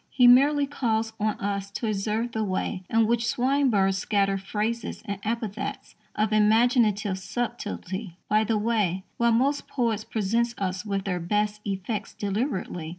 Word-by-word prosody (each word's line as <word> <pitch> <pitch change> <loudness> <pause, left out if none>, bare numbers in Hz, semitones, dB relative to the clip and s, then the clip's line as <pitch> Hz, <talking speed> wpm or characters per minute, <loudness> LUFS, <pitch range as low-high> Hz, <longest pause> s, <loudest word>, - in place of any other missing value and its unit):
He 250 - +3
merely 280 +4 +6
calls 225 -5 -1
on 215 0 0
us 200 -1 -2
to 200 - -4
observe 215 +3 -1
the 220 -1 -1
way 190 0 -2
in 225 0 +3
which 235 +1 +1
Swinburne 250 -7 +2
scatters 195 0 0
phrases 215 +4 -3
and 200 -1 -4
epithets 220 -2 -4 0.2
of 215 0 +1
"imaginative 215 -2 +3
subtlety" 205 -4 -4
by 215 +1 +3
the 220 0 +1
way, 205 -4 0
while 235 0 +3
most 270 +5 +1
poets 230 -5 -1
"present 230 +3 0
us 185 -1 -2
with 200 -2 -2
their 180 -3 -1
best 210 +4 -1
effects 200 +2 -3
deliberately." 200 - -2
215 Hz, 150 wpm, -26 LUFS, 195-235 Hz, 0.2 s, merely